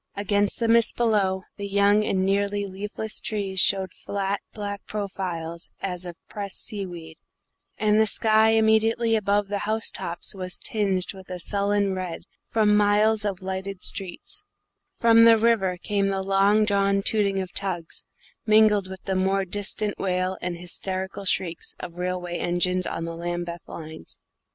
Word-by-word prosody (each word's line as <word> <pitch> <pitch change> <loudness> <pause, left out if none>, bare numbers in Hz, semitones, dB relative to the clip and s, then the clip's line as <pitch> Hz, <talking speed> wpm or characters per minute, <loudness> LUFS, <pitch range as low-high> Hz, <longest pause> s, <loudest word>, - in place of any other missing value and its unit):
Against 200 0 0
the 230 - +1
mist 230 0 +4
below, 200 -5 +1
the 200 - -4
young 200 +1 +3
and 190 -2 0
nearly 200 +1 0
leafless 205 +3 -1
trees 195 -3 -2
showed 190 -1 +4
flat, 200 0 -3
black 205 -2 -6
profiles 180 -5 -5
as 180 -2 -3
of 175 - -7
pressed 200 -2 -3
seaweed, 175 -6 -7 0.6
and 215 0 +3
the 220 - +4
sky 220 +1 +4
immediately 225 +1 +3
above 205 -1 +1
the 205 0 -2
house 220 +1 +1
tops 170 +4 -3
was 185 -2 -2
tinged 200 -6 -1
with 190 -1 -13
a 180 -1 -5
sullen 200 +1 0
red 185 -3 -5 0.2
from 210 -2 +3
miles 210 +1 +3
of 195 -2 -3
lighted 190 0 -5
streets; 195 - -2 0.5
from 230 -1 +5
the 230 0 +7
river 215 -5 +2
came 200 +2 0
the 195 -1 -1
long 195 +2 +3
drawn 200 -1 +2
tooting 200 -3 +1
of 185 -1 -5
tugs, 175 -4 -3 0.4
mingled 215 -3 +4
with 190 -1 -9
the 195 - -2
more 190 +1 +1
distant 205 +2 -3
wail 185 0 -1
and 175 -1 -3
hysterical 190 +2 -4
shrieks 175 -3 -1
of 175 -1 -8
railway 180 -1 -3
engines 180 +1 +1
on 165 - -4
the 165 0 -5
Lambeth 175 0 -4
lines. 160 - -10
195 Hz, 155 wpm, -25 LUFS, 185-210 Hz, 0.6 s, the